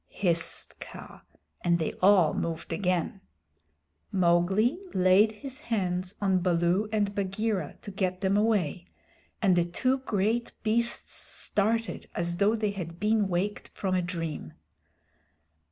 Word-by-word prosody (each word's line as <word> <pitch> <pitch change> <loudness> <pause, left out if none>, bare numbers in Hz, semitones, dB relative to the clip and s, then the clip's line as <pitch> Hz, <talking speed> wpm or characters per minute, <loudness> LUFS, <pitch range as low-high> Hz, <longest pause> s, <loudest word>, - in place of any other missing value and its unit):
hissed 170 -4 -1
Kaa, - - -10 0.4
and 170 -1 +3
they 160 - -2
all 185 -4 +5
moved 165 -1 -3
again. 185 0 -1 0.9
Mowgli 190 - +3 0.2
laid 185 +4 +5
his 260 +5 -8
hands 185 -7 -2
on 190 -2 +2
Baloo 175 +3 +2
and 205 -2 +1
Bagheera 200 -3 -2
to 205 - -7
get 185 -2 -2
them 195 0 +2
away, 200 -5 +1 0.6
and 190 -3 +5
the 175 - +4
two 255 +10 0
great 225 0 -1
beasts 235 +2 0
started 225 +2 -1
as 170 0 -1
though 205 +3 +3
they 215 -2 0
had 170 -4 -6
been 210 -1 +2
waked 190 +3 -2
from 190 -2 -1
a 185 - +2
dream. 165 - -4
190 Hz, 130 wpm, -28 LUFS, 175-215 Hz, 0.9 s, all